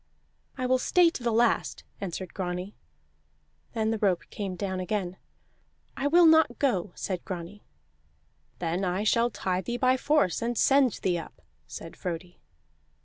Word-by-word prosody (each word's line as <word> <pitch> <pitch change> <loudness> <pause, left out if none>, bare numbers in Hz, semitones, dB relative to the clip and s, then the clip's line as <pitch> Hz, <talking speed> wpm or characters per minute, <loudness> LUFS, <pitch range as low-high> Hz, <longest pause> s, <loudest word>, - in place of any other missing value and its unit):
"I 255 - -2
will 255 0 +3
stay 345 +4 +4
to 265 - -7
the 240 -1 0
last," 230 +1 +1 0.2
answered 185 -1 -5
Grani. 180 +1 -4 1.0
Then 220 -1 0
the 225 - -1
rope 190 -4 +1
came 195 -3 -4
down 190 0 -3
again. 185 -1 -2 0.8
"I 275 0 -1
will 340 +4 +6
not 320 0 +5
go," 210 -9 0
said 185 -3 -4
Grani. 185 +3 -7 1.0
"Then 175 +2 -2
I 185 +2 0
shall 230 +2 +3
tie 190 -4 -2
thee 240 +7 -3
by 255 +1 +3
force, 290 - +2
and 235 0 -1
send 270 -4 +4
thee 175 -2 +1
up," 160 - -11 0.3
said 165 - -9
Frodi. 175 0 -6
205 Hz, 150 wpm, -28 LUFS, 180-250 Hz, 1.0 s, will